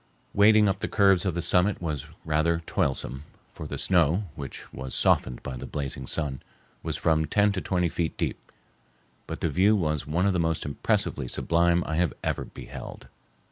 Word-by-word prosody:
Wading 105 +1 +6
up 95 - 0
the - - -2
curves 95 -3 +4
of 90 - -1
the 85 - -2
summit 90 +4 +3
was 75 -5 -4 0.2
rather 80 +2 +1
toilsome, 65 0 -1 0.3
for - - -8
the - - -5
snow, 90 +1 +2
which 70 -2 -8
was 65 -1 -5
softened 60 - +2
by 65 - -5
the - - -7
blazing 70 -3 -4
sun, 70 -5 -1 0.4
was - - -3
from 80 -1 +2
ten 105 +5 +3
to 95 -2 -3
twenty 90 -2 0
feet 85 0 -2
deep, - - -4 0.8
but - - -6
the - - +1
view 100 +7 +4
was 75 -6 -1
one 85 +5 +1
of 100 - +3
the 90 - 0
most 80 -1 0
impressively 70 -2 -1
sublime 85 +5 +2
I 80 +2 +1
ever - - -1
beheld. - - -10
85 Hz, 180 wpm, -27 LUFS, 75-95 Hz, 0.8 s, Wading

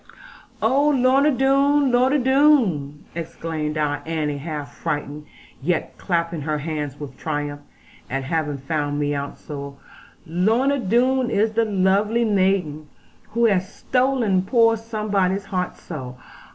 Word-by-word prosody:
'Oh 275 +6 +3
Lorna 270 +1 +4
Doone. 275 +1 +3
Lorna 255 +4 +3
Doone!' 250 - +2
exclaimed 160 -2 -4
our 145 -1 0
Annie 150 -3 -2
half 150 -1 -6
frightened, 150 -2 -4 0.3
yet 170 +4 -1
clapping 170 -3 -1
her 150 +1 -1
hands 150 -2 -4
with 145 -2 -8
triumph, 145 -2 -3 0.5
at 135 +1 -2
having 150 0 -1
found 145 +1 -2
me 145 0 0
out 140 0 -4
so: 140 -2 -8 0.5
'Lorna 225 - +1
Doone 250 +4 +2
is 215 0 +1
the 225 +1 +1
lovely 205 +3 +2
maiden, 185 -7 +1 0.5
who 235 +1 +3
has 195 -3 +1
stolen 250 -8 +1
poor 230 +3 +3
somebody's 205 -4 -1
heart 185 -2 -3
so. 130 -6 -8
185 Hz, 125 wpm, -22 LUFS, 150-235 Hz, 0.5 s, Lorna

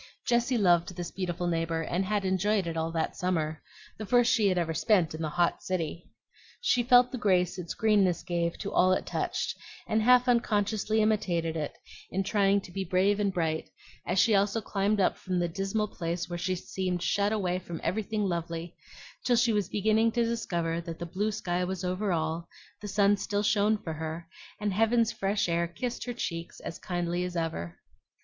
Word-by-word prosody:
Jessie 240 +1 +2
loved 175 -3 +3
this 175 -1 -5
beautiful 180 -2 -3
neighbor, 165 -1 0
and 175 +4 -1
had 205 0 0
enjoyed 190 +1 +1
it 165 -1 -3
all 160 0 -1
that 165 -1 -2
summer, 160 -4 -1 0.4
the 215 - -4
first 245 +1 +4
she 210 -3 +3
ever 170 -3 0
spent 180 -3 +2
in 155 - -6
the 155 - -1
hot 175 +2 +1
city. 170 -2 -3 0.5
She 365 - +2
felt 245 +1 +5
the 255 - -4
grace 180 -4 +2
its 170 -2 -5
greenness 200 -5 +2
gave 170 -1 -1
to 200 - -5
all 185 +1 +4
it - - -1
touched, - - -2 0.3
and 220 +1 +1
half 250 +2 +5
unconsciously 220 -2 +1
imitated 175 -7 0
it 155 -2 -4 0.3
in 195 +1 -1
trying 200 0 +2
to 185 - -12
be 195 +1 -3
brave 190 +3 +2
and 200 -1 +1
bright, 160 -4 -1 0.3
as 180 - -2
she 220 +3 +5
also 200 +2 +2
climbed 205 0 0
up 190 - +2
from 185 -1 -3
the 175 -1 +1
dismal 195 +5 -1
place 170 0 -3
where 175 - -5
she 185 +1 -1
seemed 180 0 -3
shut 200 +2 +1
away 185 -4 0
from 170 -2 -7
everything 215 +1 -1
lovely, 170 -1 -3 0.5
till 245 - +3
she 235 -1 +3
was 205 -2 0
beginning 220 +2 +2
to 235 -1 +2
discover 170 -8 -1
that 165 -1 -7
the 170 - -5
blue 195 +5 -1
sky 180 -3 -2
was 185 0 -3
over 185 +3 -1
all, 165 0 -2 0.3
the 210 - -6
sun 205 0 +3
still 205 0 -1
shone 210 0 +3
for 165 -5 -6
her, 160 +2 -5 0.3
and 210 -2 -1
heaven's 225 +2 +3
fresh 195 -1 0
air 170 0 +1
kissed 240 +8 -4
her 245 - -3
cheeks 170 -7 -5
as - - -7
kindly 175 0 -2
as 180 0 -4
ever. 85 - -3
185 Hz, 195 wpm, -29 LUFS, 170-210 Hz, 0.5 s, felt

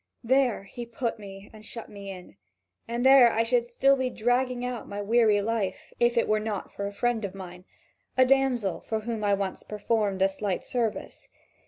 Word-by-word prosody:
There 255 -3 +2
he 235 +4 -8
put 235 -1 -3
me 195 -1 -11
and 215 -1 -13
shut 230 +1 -9
me 200 -1 -9
in, 180 - -10 0.5
and 235 +2 -2
there 265 -3 +8
I 225 - +1
should 240 0 +1
still 270 +3 +3
be 260 -1 -1
dragging 245 +1 0
out 250 -2 -5
my 200 - -5
weary 215 -1 +3
life, 215 -3 -3
if 240 0 +2
it 230 - +3
were 215 0 +2
not 210 -2 -4
for 200 - -4
a - - -5
friend 235 +2 -1
of 195 -1 -5
mine, 180 -1 -10 0.5
a 255 - +6
damsel 255 -7 +2
for 220 -1 -3
whom 225 -1 -4
I 205 -1 +3
once 195 -1 -3
performed 210 -2 -1
a 195 - +4
slight 195 -1 -3
service. 235 -4 -3
225 Hz, 195 wpm, -27 LUFS, 200-240 Hz, 0.5 s, there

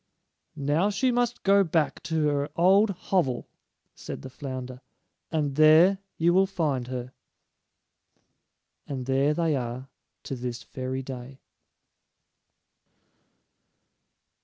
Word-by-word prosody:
"Now 150 +6 +1
she 250 +5 +1
must 245 0 -1
go 200 +1 +5
back 160 -3 0
to 160 -2 +1
her 145 0 -1
old 195 +5 +5
hovel," 175 -9 -1 0.5
said - - -8
the - - -8
flounder; 130 -2 -7 0.5
"and 150 -4 0
there 160 +6 +6 0.2
you 170 +1 +3
will 190 +1 +4
find 145 -10 -1
her." 125 0 -6 1.7
And 130 -3 -4
there 135 +3 +2
they 165 -2 +1
are 125 +1 -4 0.3
to 135 - -5
this 125 0 -5
very 130 0 -5
day! 130 0 -8
145 Hz, 110 wpm, -26 LUFS, 130-175 Hz, 1.7 s, there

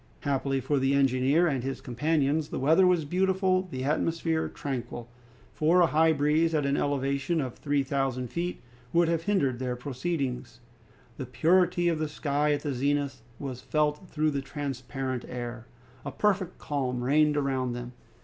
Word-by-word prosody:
Happily 135 -1 0
for 135 +2 0
the 135 +1 +2
engineer 135 +4 +3
and 135 -7 0
his 135 0 -3
companions 145 +3 0
the - - -4
weather 160 +8 +4
was 175 -4 +2
beautiful, 185 +2 +1
the 130 -5 -4
atmosphere 160 +2 0
tranquil; 120 -4 -5 0.5
for 165 +4 +3
a - - +7
high 160 0 +3
breeze 155 +2 +2
at 150 -2 +1
an 140 0 +1
elevation 140 +4 0
of 130 -5 -3
three 145 -1 0
thousand 135 -2 -1
feet 175 -2 -4 0.3
would 170 0 +4
have 165 -1 +1
hindered 140 -12 +1
their 125 -1 -2
proceedings. 130 -2 -3 0.6
The 130 - -5
purity 175 +8 +3
of 165 -2 +1
the 155 -1 -1
sky 150 0 0
at 145 - -2
the 145 -3 -2
zenith 140 0 -1 0.2
was 130 -3 -6
felt 150 +5 -1
through 155 0 +1
the 140 -1 -2
transparent 135 -2 -4
air. 120 -1 -6 0.4
A 140 - -5
perfect 190 +3 0
calm 130 -5 -2
reigned 150 +3 +3
around 130 -3 0
them. 120 0 -6
145 Hz, 165 wpm, -28 LUFS, 130-160 Hz, 0.6 s, a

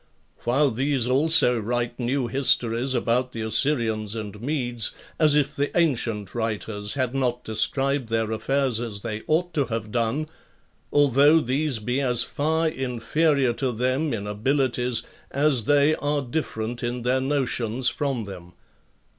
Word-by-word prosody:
While 135 +4 +2
these 130 +1 0
also 135 -2 +4
write 120 +2 -2
new 125 +2 -1
histories 125 0 +2
about 125 +1 0
the 115 - -5
Assyrians 110 -2 +1
and 105 -1 -7
Medes, 120 -5 -1 0.3
as 150 -2 +5
if 150 -2 +1
the 145 +1 -1
ancient 115 - 0
writers 110 -2 -3
had 130 -2 -1
not 125 -2 -1
described 130 +4 +1
their 110 -1 -1
affairs 130 +1 0
as 110 -4 -3
they 110 -1 -5
ought 175 +3 0
to 145 -3 +1
have 115 -3 -5
done; 120 +6 -1 0.6
although 145 +2 +5
these 135 0 -1
be 125 +5 -2
as 125 -3 +3
far 160 +3 0
inferior 135 +1 0
to 125 +2 -2
them 130 +6 -1
in 105 -3 -3
abilities 125 +2 0 0.3
as 140 -5 +1
they 145 +2 +4
are 145 -1 -1
different 120 -4 -4
in 120 0 -3
their 130 +2 +1
notions 130 -3 -1
from 135 -5 -2
them. 90 -3 -10
125 Hz, 145 wpm, -24 LUFS, 115-140 Hz, 0.6 s, as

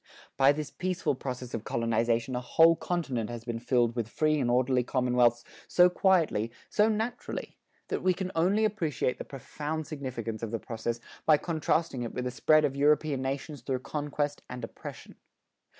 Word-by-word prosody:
By 135 +1 +6
this 150 0 -4
peaceful 185 -4 -1
process 125 -2 -6
of 110 - -3
colonization 115 +2 0
a 125 - -1
whole 165 +6 +5
continent 135 -12 -2
has 120 -1 -7
been 120 -1 -3
filled 120 -1 +1
with 115 -2 -2
free 155 +2 +1
and 125 -3 +1
orderly 125 +1 +3
commonwealths 125 -2 +2 0.2
so 180 0 +5
quietly, 165 - +2 0.2
so 210 +1 +4
naturally, 220 +3 -3 0.3
that - - -1
we 185 -1 +2
can 185 0 -3
only 195 +7 +3
appreciate 160 - -1
the - - -4
profound 150 +3 -5
significance 125 -7 -5
of 115 - -3
the 115 - -2
process 115 +1 -4 0.3
by 155 -2 +7
contrasting 160 -3 -1
it 120 - -5
with 125 - -2
the 125 - -1
spread 155 +4 +4
of 140 -2 -1
European 145 -1 +2
nations 135 +1 -4
through 130 0 -2
conquest 145 0 -3
and 125 0 -7
oppression. - - -9
135 Hz, 170 wpm, -29 LUFS, 120-155 Hz, 0.3 s, by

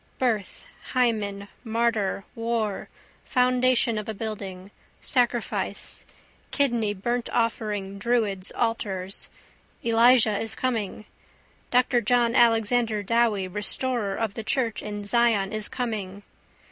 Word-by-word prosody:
Birth, 225 -6 -1 0.3
hymen, 210 -5 0 0.2
martyr, 225 -4 0
war, 230 -3 -2 0.3
foundation 250 -2 +2
of 210 - -6
a 220 - -3
building, 195 -3 -6 0.3
sacrifice, 245 -2 0 0.4
kidney 235 -7 +1
burntoffering, 215 -3 -2
druids' 210 -4 +1
altars. 200 -5 -1 0.6
Elijah 230 -2 +5
is 225 -1 -2
coming. 220 -4 -2 0.6
Dr 250 -1 +3
John 235 +1 +2
Alexander 225 -2 +3
Dowie 220 -3 +1
restorer 210 +2 0
of 220 -3 -2
the 225 - -6
church 230 -1 0
in 205 -1 -5
Zion 220 -2 +2
is 215 -1 +1
coming. 205 -5 -4
225 Hz, 100 wpm, -25 LUFS, 205-240 Hz, 0.6 s, Elijah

